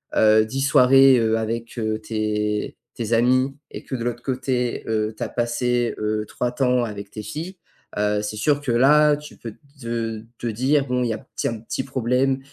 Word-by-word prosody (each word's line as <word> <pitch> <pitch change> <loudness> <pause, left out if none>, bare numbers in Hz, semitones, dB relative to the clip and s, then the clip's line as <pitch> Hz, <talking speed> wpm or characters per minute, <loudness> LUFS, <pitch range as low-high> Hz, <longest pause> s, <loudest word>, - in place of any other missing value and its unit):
hein, - - +2 0.2
heu, - - 0
10 135 +5 -3
soirées, 135 -1 +6
heu, 115 -1 +2
avec 115 +2 -4
heu, 110 -1 -1
tes 105 -1 -2 0.2
tes 115 -1 -3
amis, 130 +3 +2 0.2
et - - -8
que 130 - -5
de 120 - -4
l'autre 120 0 -3
côté, 125 -2 -2
heu, 110 0 -1
tu - - -16
as - - -3
passé, 120 0 0
heu, 105 0 -1
3 125 - -2
temps 125 -1 +1
avec 100 -3 -6
tes 110 - -6
filles, 160 - -6 0.4
heu. 105 0 +1
C'est 105 0 -4
sûr 145 +5 +2
que 130 - -2
là 145 +5 +5
tu 150 0 -12
peux 115 -2 -8 0.3
te 115 -2 -3 0.2
te 120 - -4
dire: 135 +6 +1
«Bon, 125 0 0
il 120 - -1
y - - 0
a - - -5
petit 135 - -5
un 115 -2 -3
petit 115 +4 -4
problème 130 +1 0
120 Hz, 205 wpm, -22 LUFS, 110-130 Hz, 0.4 s, soirées